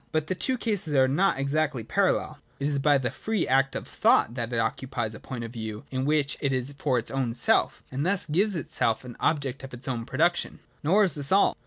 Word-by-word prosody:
But 155 -1 0
the 185 - -1
two 255 +8 0
cases 205 -10 0
are 130 -1 +5
not 155 +5 +2
exactly 140 -2 0
parallel. 155 - 0 0.2
It 140 - 0
is 145 -1 0
by 145 +1 +4
the 125 -3 -2
free 220 -4 -2
act 135 +1 +2
of - - -5
thought 115 - +3
that 120 -1 -4
it 120 - -1
occupies 115 0 -2
a 105 - -9
point 125 -3 -6
of 115 0 -7
view, 110 +1 -6
in 130 0 -1
which 150 -1 +1
it 140 - +1
is 130 +1 -1
for 130 -4 +1
its 115 - -3
own 130 -4 -1
self, 120 - +2
and 135 +2 -2
thus 190 +3 0
gives 190 +6 +1
itself 120 -7 0
an 120 - -9
object 140 -4 -1
of 135 -1 -8
its 120 - -9
own 120 -3 -3
production. 170 +6 +1 0.2
Nor 190 +8 +4
is 185 -6 +1
this 145 -1 -1
all. 195 +1 +4
140 Hz, 230 wpm, -27 LUFS, 125-155 Hz, 0.2 s, are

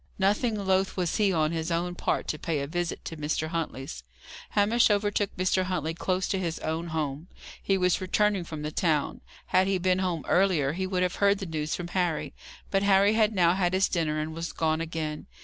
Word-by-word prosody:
Nothing 210 +4 +1
loth 190 -1 0
was 180 -3 0
he, 205 -2 +3
on 155 -3 +1
his 165 0 -2
own 175 +1 -1
part, - - -1
to 155 - -2
pay 160 -2 -1
a - - -2
visit 175 +3 -3
to 165 - -5
Mr. 155 +1 -2
Huntley's. 135 - -4 0.5
Hamish 225 +4 +4
overtook 205 -1 0
Mr. 185 0 +1
Huntley 170 -4 -2
close 185 +2 -1
to 195 - 0
his 170 -3 -2
own 160 +2 -2
home. 155 -1 -3 0.3
He 195 - +1
was 180 -1 +2
returning 200 +1 +1
from 155 -3 -7
the 150 - -3
town. 155 -3 0 0.3
Had 185 +1 +4
he 195 -1 +2
been 185 0 +1
home 180 -5 -1
earlier, 175 -7 +2
he 185 +2 -2
would 185 -1 0
have 180 - -1
heard 200 0 +4
the 195 - -5
news 155 -2 -2
from 175 -1 -6
Harry. 175 -4 -1 0.4
But 195 - +2
Harry 200 +1 +4
had 220 -1 +2
now 175 -2 +4
had 185 -1 +1
his 190 +1 +3
dinner 160 -3 -1
and 155 +1 -3
was 165 +1 -5
gone 160 0 0
again. 160 -2 -4
175 Hz, 210 wpm, -27 LUFS, 160-190 Hz, 0.5 s, Hamish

